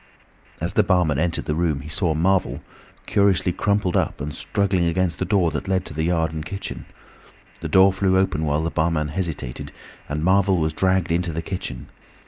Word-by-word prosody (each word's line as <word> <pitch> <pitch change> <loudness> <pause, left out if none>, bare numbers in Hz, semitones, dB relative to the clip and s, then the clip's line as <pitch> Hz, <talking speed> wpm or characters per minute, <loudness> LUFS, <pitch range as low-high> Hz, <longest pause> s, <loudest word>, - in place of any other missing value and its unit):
As - - -3
the - - +4
barman 85 -6 +2
entered 85 +1 -1
the 75 - -1
room 80 -4 0
he 70 - -9
saw 80 0 +1
Marvel, 95 +4 +1 0.4
curiously 100 -3 +2
crumpled 100 -2 0
up - - 0
and 75 +1 -4
struggling 95 0 0
against 85 -1 0
the - - 0
door 95 -6 +2
that 75 - -4
led 95 -1 0
to 80 - -7
the 80 - -2
yard 80 -2 0
and 80 -1 -4
kitchen. 100 +4 -6 0.7
The - - -5
door 95 0 +6
flew 95 -1 +2
open 95 -5 +1
while 75 0 0
the 85 - -1
barman 80 -1 0
hesitated, 80 -7 -4 0.4
and 75 +1 -2
Marvel 95 +1 +3
was 80 -1 0
dragged 95 -1 +1
into 85 0 0
the 80 +1 -4
kitchen. 90 -11 -5
85 Hz, 190 wpm, -22 LUFS, 80-95 Hz, 0.7 s, door